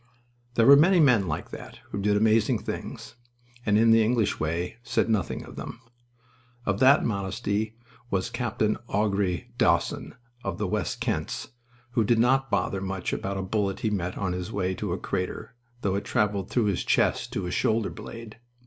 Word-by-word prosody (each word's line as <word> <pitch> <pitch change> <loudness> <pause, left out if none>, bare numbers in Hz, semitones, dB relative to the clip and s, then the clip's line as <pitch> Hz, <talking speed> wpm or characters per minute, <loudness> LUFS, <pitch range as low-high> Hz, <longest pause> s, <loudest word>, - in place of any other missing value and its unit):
There 115 - +4
were 140 - +10
many 175 +6 +5
men 125 - +5
like 80 - -4
that - - -9
who 100 - -3
did 105 +1 +2
amazing 110 0 +3
things - - -6 0.5
and, 105 0 +4
in 115 +1 +5
the 115 0 +6
English 115 -1 +1
way, 85 +7 -2
said 115 -1 0
nothing 105 -5 -1
of - - -12
them. - - -7 0.9
Of 100 0 0
that 135 +2 +6
modesty 100 +1 -2 0.3
was 95 -3 -1
Capt. 120 -4 -4
Augrere 100 -4 0
Dawson, - - +1 0.3
of 95 -3 -3
the 105 - -1
West 95 0 -2
Kents, - - -2 0.4
who 120 -2 +2
did 115 +2 +3
not 135 +3 +3
bother 100 -1 0
much 95 -1 -3
about 100 0 -3
a 95 - -2
bullet 100 0 -1
he 110 - 0
met 90 -3 -2
on 95 -2 -1
his 90 +3 -4
way 95 -3 -1
to 100 0 -4
a 90 - -1
crater, 95 +5 -4 0.3
though 100 - 0
it 100 - -1
traveled 100 -2 0
through 120 -3 +1
his 100 -4 0
chest - - +1
to 100 - -2
his 90 - -3
shoulder 110 -1 +1
blade. 115 -1 -9
105 Hz, 180 wpm, -26 LUFS, 95-115 Hz, 0.9 s, were